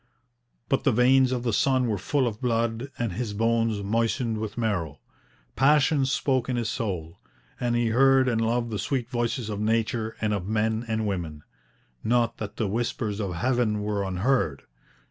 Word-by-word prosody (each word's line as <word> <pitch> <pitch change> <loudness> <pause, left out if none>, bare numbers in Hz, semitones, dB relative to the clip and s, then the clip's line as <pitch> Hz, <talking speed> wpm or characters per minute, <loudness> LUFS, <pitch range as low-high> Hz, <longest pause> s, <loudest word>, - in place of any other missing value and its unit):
But 135 - +1
the 135 - +4
veins 130 +2 +4
of 125 -2 -1
the 120 -3 0
son 130 +2 +2
were 105 -4 -1
full 135 +7 0
of 110 0 -5
blood 115 +1 -1
and 115 -6 -2
his 105 0 -4
bones 115 -1 +1
moistened 115 +2 0
with 110 0 -5
marrow. 100 -11 -2 0.6
Passion 140 +1 +3
spoke 130 -2 0
in 125 - 0
his 120 -2 -1
soul, 90 -8 -4 0.4
and 120 -1 0
he 120 -1 +1
heard 135 +2 +4
and 115 -2 +1
loved 115 +1 0
the 105 - -2
sweet 130 -4 -2
voices 120 -1 -1
of 105 -2 -4
nature, 110 +1 0
and 105 -1 0
of 95 -2 -3
men 110 +2 0
and 110 -1 -1
women. 85 -7 -4 0.6
Not 120 0 +1
that 105 -2 -6
the 110 - -1
whispers 110 0 -2
of 95 -4 -3
heaven 115 0 0
were 105 -1 -1
unheard. 95 - 0
115 Hz, 175 wpm, -26 LUFS, 105-125 Hz, 0.6 s, the